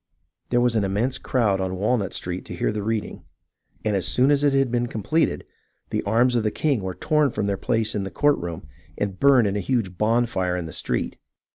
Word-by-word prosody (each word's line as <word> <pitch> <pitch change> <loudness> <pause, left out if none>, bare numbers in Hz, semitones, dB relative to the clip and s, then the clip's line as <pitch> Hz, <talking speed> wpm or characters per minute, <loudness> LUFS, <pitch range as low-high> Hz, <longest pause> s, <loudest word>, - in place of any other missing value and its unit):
There 120 - +2
was 120 -1 +2
an 110 - +2
immense 105 +7 0
crowd 105 -7 +1
on 95 0 -2
Walnut 105 0 0
street 90 +1 -4
to 90 - -7
hear 85 - 0
the 105 0 -3
reading, 110 +1 -3 0.6
and 105 -1 +1
as 90 -3 0
soon 130 +9 +3
as 145 0 +3
it 145 - +4
had 135 -2 +2
been 120 0 0
completed, 120 +9 0 0.5
the - - 0
arms 120 +5 +3
of 120 - +3
the 110 - +1
king 140 -1 0
were 95 -1 -4
torn 150 -2 +2
from 105 - -2
their 100 -1 0
place 115 0 -1
in 105 - -1
the 95 - -4
court 145 +7 +2
room 85 -3 -6 0.3
and 100 -2 -3
burned 135 -4 +5
in 100 0 0
a - - 0
huge 100 -7 -2
bonfire 110 -5 +1
in 90 - -4
tlie 80 - -8
street. - - -2
110 Hz, 225 wpm, -24 LUFS, 95-125 Hz, 0.6 s, burned